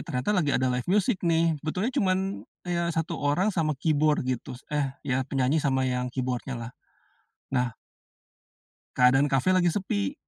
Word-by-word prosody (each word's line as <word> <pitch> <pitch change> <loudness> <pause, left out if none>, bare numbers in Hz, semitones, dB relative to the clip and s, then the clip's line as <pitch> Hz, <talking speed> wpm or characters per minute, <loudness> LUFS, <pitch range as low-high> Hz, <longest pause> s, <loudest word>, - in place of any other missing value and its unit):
ternyata 135 +5 -1
lagi 175 -7 +2
ada 130 0 +1
live 125 +5 -3
music 205 +1 +2
nih, 165 -1 +2
sebetulnya 185 +11 -2
cuman 185 -4 +2 0.5
ya 170 -1 -1
1 165 0 -2
orang 175 +9 +1
sama 155 -4 0
keyboard 150 -1 +2
gitu, 130 0 -3 0.2
eh 140 -2 -1
ya 130 0 0
penyanyi 135 +3 +1
sama 130 -2 +1
yang 125 -1 -1
keyboard-nya 130 0 -3
lah, 115 0 -6 0.8
nah 125 -2 0 1.2
keadaan 135 +3 +5
kafe 135 +6 +2
lagi 185 -2 +4
sepi. 100 - -1
145 Hz, 150 wpm, -27 LUFS, 130-170 Hz, 1.2 s, keadaan